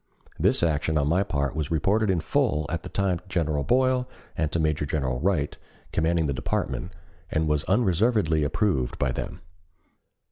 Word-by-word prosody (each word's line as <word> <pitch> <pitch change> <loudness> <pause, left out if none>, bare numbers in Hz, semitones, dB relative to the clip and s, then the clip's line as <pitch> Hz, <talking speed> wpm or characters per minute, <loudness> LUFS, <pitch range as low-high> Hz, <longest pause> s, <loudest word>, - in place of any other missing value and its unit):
This - - +3
action 80 -1 +1
on 70 -1 +2
my 85 +5 +3
part 70 -5 -1
was 75 -2 -2
reported 100 +7 +2
in 90 -3 +2
full 95 - +1
at 85 - -2
the - - -8
time 95 -3 0
to 90 - -25
General 80 -6 0
Boyle 130 - +2 0.3
and 80 -2 -1
to 85 - 0
Major 75 -1 +1
General 65 -4 -1
Wright, 85 -6 0 0.4
commanding 80 0 +1
the 70 - 0
department, 90 +7 -2 0.4
and 80 0 0
was 75 -1 +1
unreservedly 95 -5 +2
approved 70 - 0
by 65 - 0
them. 90 +8 -5
80 Hz, 170 wpm, -26 LUFS, 75-95 Hz, 0.4 s, This